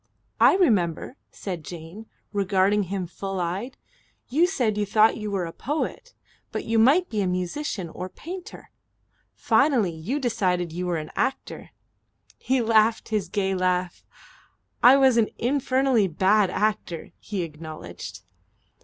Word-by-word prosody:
"I - - +6
remember," 210 - +1
said 180 -5 -6
Jane, 175 +7 -9 0.3
regarding 200 0 +2
him 195 -2 -2
full 195 +2 -5
eyed. 190 +9 -3 0.5
"You 315 +8 +3
said 245 - 0
you 210 - 0
thought 215 +2 +4
you 210 -2 -5
were 195 -3 -1
a 165 - -7
poet 320 - -4 0.4
but - - -4
you 225 0 +1
might 295 +11 +5
be 215 -2 -2
a 190 - 0
musician 180 - -3
or 180 +3 -7
painter. 355 - -9 0.6
Finally 255 - +2
you 185 - -3
decided 180 - 0
you 180 +2 -4
were 175 -2 0
an 155 0 -6
actor." 265 - -3 0.7
He 260 -1 +1
laughed 220 0 +3
his 210 -5 -1
gay 195 0 0
laugh. 180 -1 -1 0.8
"I 260 +3 +8
was 265 -3 +4
an 225 -2 +3
infernally 260 -3 +2
bad 190 +4 +3
actor," 200 -4 -2
he 200 -4 -4
acknowledged. 155 -1 -9
205 Hz, 140 wpm, -25 LUFS, 180-245 Hz, 0.8 s, I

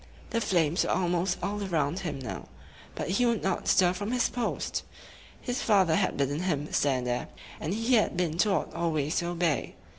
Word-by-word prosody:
The 230 - 0
flames 170 -5 +2
were - - -2
almost 180 0 +1
all 205 +2 -2
around 165 -3 0
him 165 -7 -3
now; 100 - -6 0.5
but - - -3
he 200 +8 +2
would 230 -2 0
not 190 -1 -1
stir 180 -1 +4
from 205 +3 -4
his 250 -1 +2
post. 245 - -2 0.6
His 250 +2 -3
father 190 -7 +4
had 195 0 +1
bidden 140 +1 0
him 155 -5 -2
stand 130 -3 +1
there, 125 0 -1 0.3
and 155 - -3
he 230 +5 0
had 215 -6 +3
been 170 -2 -1
taught 195 -7 +1
always 155 -2 0
to 170 - 0
obey. 170 -4 -1
175 Hz, 185 wpm, -28 LUFS, 155-200 Hz, 0.6 s, stir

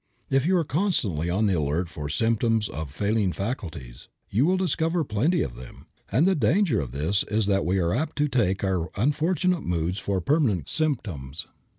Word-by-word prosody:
If 135 +3 +2
you 185 0 +4
are 170 - +2
constantly 135 - 0
on 100 +5 +1
the 100 - +2
alert 80 +2 0
for 75 -3 -6
symptoms 115 +5 +1
of 75 -1 -5
failing 100 +4 0
faculties, 85 - -6 0.2
you 120 +10 +3
will 185 +1 +3
discover 170 -1 0
plenty 135 - +1
of 65 - -5
them; 60 0 -12 0.3
and 130 - +3
the 190 - +4
great 150 -3 +2
danger 200 - +2
of 65 -4 -6
this 80 +10 +1
is 105 +1 +1
that 100 -2 +1
we 95 +2 +2
are 85 -2 +1
apt 155 0 -1
to 150 0 +1
take 105 -9 0
our 95 -3 0
unfortunate 160 - +1
moods 85 +2 -1
for 100 -2 -1
permanent 110 - +1
symptoms. 95 - -2
105 Hz, 190 wpm, -25 LUFS, -, 0.3 s, you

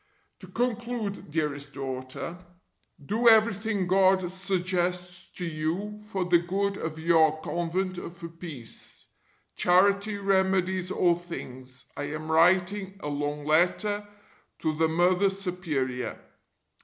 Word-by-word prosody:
To 185 - -11
conclude, 230 -2 -2
dearest 145 -2 -2
daughter, 130 +5 -5 0.7
do 230 +8 +4
everything 220 -2 +3
God 185 -1 +3
suggests 180 -1 -2
to 180 - -4
you 170 +7 -3
for 190 -4 -2
the 175 -1 +5
good 195 +3 -1
of 160 -1 -4
your 160 -1 +4
Convent 175 +2 -2
and - - -7
for 170 -1 -8
peace. 165 -8 -8 0.5
Charity 200 +3 +3
remedies 190 -2 +1
all 175 -2 +3
things. 130 -7 -8
I 145 - -3
am 155 +2 -5
writing 190 +4 +3
a 150 - -2
long 145 0 -3
letter 205 +6 +2 0.5
to 155 - +1
the 160 +1 +3
(Mother) 180 +4 +3
Superior. 160 - -2
180 Hz, 120 wpm, -27 LUFS, 160-195 Hz, 0.7 s, the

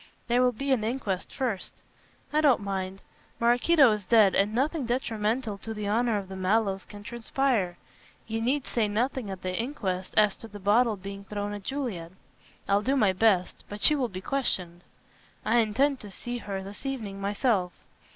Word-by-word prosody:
"There 245 +1 +3
will 250 0 +4
be 275 +4 -3
an 245 -5 +2
inquest 215 -5 -2
first." 235 -8 -3 0.5
"I 305 - +3
don't 280 -5 +5
mind. 195 -1 -4 0.4
Maraquito 245 +4 +5
is 210 -1 -1
dead 205 0 +5
and 200 +2 +2
nothing 275 +3 0
detrimental 225 -2 -1
to 220 +2 -6
the 210 -1 -4
honor 225 +1 +2
of 195 -2 -5
the 190 - -8
Mallows 195 +1 +1
can 205 -1 -11
transpire. 235 -5 -1 0.5
You 225 0 -3
need 265 +4 0
say 225 -3 0
nothing 235 +2 -1
at 190 -1 -7
the 185 0 -2
inquest 195 -7 -3
as 210 -2 +5
to 225 - -9
the 205 -1 -10
bottle 215 +3 +3
being 195 +1 -8
thrown 205 0 -4
at 205 - -6
Juliet." 195 -9 -4 0.5
"I'll 200 +1 +3
do 265 +5 +1
my 210 -8 +3
best. 185 -2 +2
But 205 - -6
she 305 - +7
will 265 -5 0
be 185 -2 -7
questioned." 180 -10 0 0.6
"I 240 - +3
intend 260 +5 +2
to 210 - -9
see 240 +4 -5
her 195 -3 -5
this 200 +4 -9
evening 220 -8 -4
myself." 200 -2 +1
215 Hz, 180 wpm, -28 LUFS, 195-245 Hz, 0.6 s, she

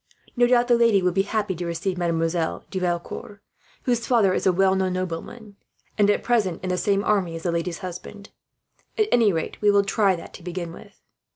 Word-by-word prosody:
No 245 -1 +4
doubt 245 0 +3
the 245 - +4
lady 230 -5 +4
will 180 - +3
be 195 +2 +2
happy 205 0 -1
to 175 0 -5
receive 170 +3 -2
Mademoiselle 165 -1 -1
de 190 - -2
Valecourt, 180 +3 -4 0.4
whose 240 -2 0
father 220 -7 +3
is - - 0
a - - +6
well 190 +1 +3
known 190 -1 0
nobleman 185 +4 -6 0.4
and, 205 -1 +3
at 205 - +1
present, 210 -9 0
in 185 - -2
the 180 - 0
same 200 -1 +1
army 190 -6 +1
as 165 - -7
the 175 - 0
lady's 170 0 -2
husband. 200 +3 -9 0.7
At 430 -1 +2
any 225 -4 +4
rate, 165 -3 -4
we 210 - +4
will 200 0 +4
try 200 -1 +2
that 165 - -10
to - - -11
begin 175 -1 -5
with." - - -14
190 Hz, 210 wpm, -24 LUFS, 175-210 Hz, 0.7 s, a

